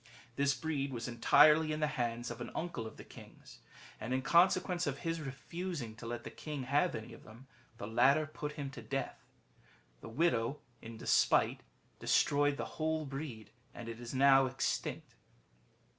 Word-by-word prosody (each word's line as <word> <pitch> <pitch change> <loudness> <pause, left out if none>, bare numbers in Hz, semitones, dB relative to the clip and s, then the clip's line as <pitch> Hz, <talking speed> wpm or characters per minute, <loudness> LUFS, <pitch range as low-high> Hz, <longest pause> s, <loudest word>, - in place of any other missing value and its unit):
This 140 +1 +2
breed 145 -4 -2
was 115 -2 -4
entirely 150 +6 +5
in 155 - -2
the 155 - +2
hands 120 -5 -2
of 120 0 -7
an - - -5
uncle 160 -10 -3
of - - -11
the - - -9
king's; - - -14 0.4
and 115 +4 -2
in 130 - -1
consequence 180 +1 +3
ol 145 - +1
his 165 +3 -3
refusing 145 -2 -5
to 115 - -8
let 120 0 -4
the - - -7
king 150 -3 -6
have 145 +7 +1
any 110 - -7
of - - -13
them, 115 +4 -14 0.3
the 115 - -6
latter 135 +8 +4
put 150 -1 -6
him 140 -3 -5
to 125 - -9
death. 135 +4 -4 0.8
The - - -9
widow 135 -1 +1 0.2
then, 115 - -9
in - - -10
despite, - - +3 0.4
destroyed 145 0 +2
the - - -3 0.2
whole 160 0 0
breed, 135 -5 -7 0.2
and 120 -1 -8
it 115 0 -6
is 120 -1 -7
now 135 0 +5
extinct." 130 +1 -3
140 Hz, 175 wpm, -34 LUFS, 120-155 Hz, 0.8 s, entirely